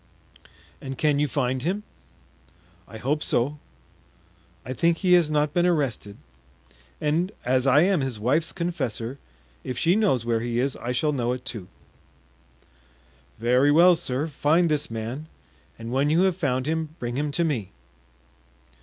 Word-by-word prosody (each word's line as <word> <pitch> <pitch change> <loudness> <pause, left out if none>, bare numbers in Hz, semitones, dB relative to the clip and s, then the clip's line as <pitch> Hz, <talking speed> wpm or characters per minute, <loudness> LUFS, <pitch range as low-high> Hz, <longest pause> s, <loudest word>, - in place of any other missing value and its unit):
"And 135 -1 -6
can 150 -2 +2
you 150 - +2
find 130 0 -1
him?" 190 +8 -2 1.0
"I 110 - -10
hope 145 +7 -1
so. 145 +4 -1 1.1
I 130 - -4
think 170 +6 +2
he 180 -1 +2
has 175 -4 +5
not 150 -1 +1
been 175 +1 +3
arrested, 135 -11 -1 0.8
and 165 +6 0
as 130 +1 +2
I 140 +4 +6
am 190 -4 +2
his 130 -5 -3
wife's 145 +9 +1
confessor, 135 - -3 0.4
if 125 - -5
she 170 +2 +3
knows 190 - +2
where 115 -1 +1
he 120 +1 -3
is 130 +2 0
I 120 - -4
shall 150 +4 +1
know 125 -2 0
it 125 0 -7
too." 110 -8 -6 1.7
"Very 125 +5 +3
well, 175 +4 +6
sir, 145 -4 -2
find 160 +3 +2
this 150 -1 0
man, 115 +7 -5 0.5
and 115 +1 -7
when 135 +3 +1
you 165 +3 +3
have 190 -2 +2
found 130 -7 -1
him 160 0 -2
bring 120 0 -4
him 145 +2 -1
to 170 - +2
me." 125 - -2
140 Hz, 155 wpm, -25 LUFS, 125-160 Hz, 1.7 s, I